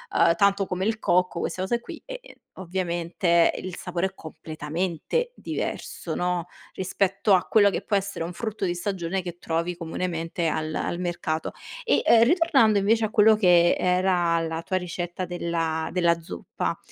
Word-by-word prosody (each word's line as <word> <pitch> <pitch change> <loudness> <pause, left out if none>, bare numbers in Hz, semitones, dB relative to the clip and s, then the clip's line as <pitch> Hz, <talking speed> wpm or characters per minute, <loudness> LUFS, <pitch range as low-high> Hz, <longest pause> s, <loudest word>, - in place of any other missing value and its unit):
ehm, 165 - +5
tanto 200 +1 +3
come 185 +2 -2
il 220 0 0
cocco 180 +1 +1
queste 185 - -3
cose 235 +5 0
qui, - - -9
e - - -7
e - - -15 0.2
ovviamente 170 -1 +1
il 185 -1 -6
sapore 180 +1 -2
è 190 - -12
completamente 160 - -3
diverso, - - -4
no, 180 -1 -1 0.3
rispetto 195 +1 +1
a 180 - +4
quello 205 -2 +5
che - - -3
può 205 - -1
essere 195 -4 -2
un 175 - -6
frutto 220 -1 -3
di 175 - 0
stagione 185 0 -2
che 175 -1 -8
trovi 170 +1 -2
comunemente 165 0 -3
al 155 0 -2
al 175 - -2
mercato. 175 -3 -2 0.3
E, 470 - +2
ehm, 230 -1 +7
ritornando 270 - +4
invece 220 +3 +2
a - - -3
quello 220 0 +5
che 175 -4 +5
era 180 -2 +2
la 165 0 -3
tua 185 - -1
ricetta 180 0 -4
della 165 -2 -2
della 170 -2 +2
zuppa. 90 - -4
180 Hz, 165 wpm, -25 LUFS, 170-195 Hz, 0.3 s, ehm